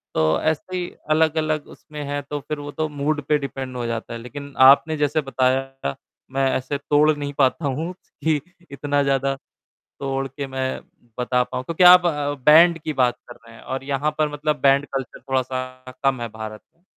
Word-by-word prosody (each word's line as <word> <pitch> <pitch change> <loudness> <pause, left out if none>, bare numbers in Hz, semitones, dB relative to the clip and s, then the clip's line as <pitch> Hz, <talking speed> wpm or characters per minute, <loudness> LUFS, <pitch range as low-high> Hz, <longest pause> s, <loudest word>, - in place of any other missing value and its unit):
तो 80 0 +2
ऐसे 160 +4 -1
ही 175 -1 -3 0.2
अलग-अलग 155 -1 +1
उसमें 150 -1 -9
है 145 0 -2
तो 145 0 -3
फ़िर 145 +2 -5
वो 145 0 -6
तो 155 +1 -2
मूड 145 +1 -1
पे 150 - +4
डिपेंड 135 -2 -6
हो 120 - -3
जाता 115 0 -4
है, 115 - -5
लेक़िन 140 +4 -9 0.2
आपने 155 +3 +4
जैसे 150 +1 +1
बताया, 135 - -1 0.4
मैं 135 0 +1
ऐसे 130 +2 -2
तोड़ 150 +1 +3
नहीं 145 0 -4
पाता 140 +3 +2
हूँ 160 +7 -3 0.3
कि 155 -3 +2 0.3
इतना 145 0 0
ज़्यादा 135 0 +1 0.6
तोड़ 135 0 -2
के 140 +1 -6
मैं 130 0 -3 0.4
बता 125 0 +2
पाऊँ। 125 +1 -5
क्योंकि 165 +5 0
आप 180 0 +9
अ, 145 -3 0
बैंड 165 +2 +7
की 155 0 -4
बात 125 -2 +2
कर 120 - -9
रहे 115 0 -14
हैं - - -14
और 135 0 -4
यहाँ 140 +2 -1
पर 155 -1 +2
मतलब 150 +1 -1
बैंड 140 +1 +5
कल्चर 135 -3 -4
थोड़ा 130 -1 +2
सा 130 0 -6
कम 135 -3 +2
है 120 - -2
भारत 110 -1 -8
में। 170 - -37
140 Hz, 195 wpm, -22 LUFS, 130-150 Hz, 0.6 s, आप